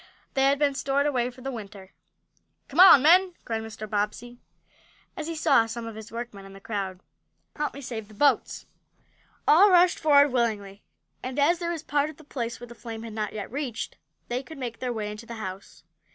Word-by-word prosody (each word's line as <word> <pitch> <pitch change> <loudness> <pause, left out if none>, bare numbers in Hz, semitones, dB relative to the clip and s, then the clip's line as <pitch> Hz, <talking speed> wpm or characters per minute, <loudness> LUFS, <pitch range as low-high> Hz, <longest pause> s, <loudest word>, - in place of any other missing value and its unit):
They 270 0 +2
had 280 +1 +4
been 285 -1 +2
stored 275 +1 0
away 250 -4 +1
for 255 +1 -14
the 270 +1 -4
winter. 200 -5 -9 0.8
"Come 290 - -3
on, 365 -8 +10
men!" 360 +3 +5
cried 225 -1 -2
Mr. 220 -1 -8
Bobbsey, 215 +4 -3 0.8
as 310 - -5
he 330 - -4
saw 275 -7 +3
some 230 +1 -6
of 225 - -6
his 220 0 -10
workmen 230 -4 -7
in 195 0 -12
the 195 - -12
crowd. 195 -3 -4 0.5
"Help 300 -2 -3
me 280 - -8
save 225 -5 -6
the 215 - -16
boats!" 285 +6 +1 0.8
All 370 +7 +7
rushed 360 -1 +5
forward 285 -2 +5
willingly, 210 -5 -1 0.4
and, 255 +1 -5
as 325 +4 +3
there 340 -1 -2
was 330 -2 -4
part 290 0 0
of 310 - -11
the 315 - -15
place 235 -5 -5
where 245 - -8
the 240 - -12
flames 230 -1 -8
had 225 -2 -8
not 210 -1 -3
yet 210 -1 -6
reached, 265 -4 -4 0.3
they 245 +1 -2
could 275 +3 -11
make 240 -4 -5
their 250 -1 -2
way 215 -3 -3
into 210 +2 -10
the 235 - -7
house. 195 -3 -8
240 Hz, 210 wpm, -26 LUFS, 220-285 Hz, 0.8 s, on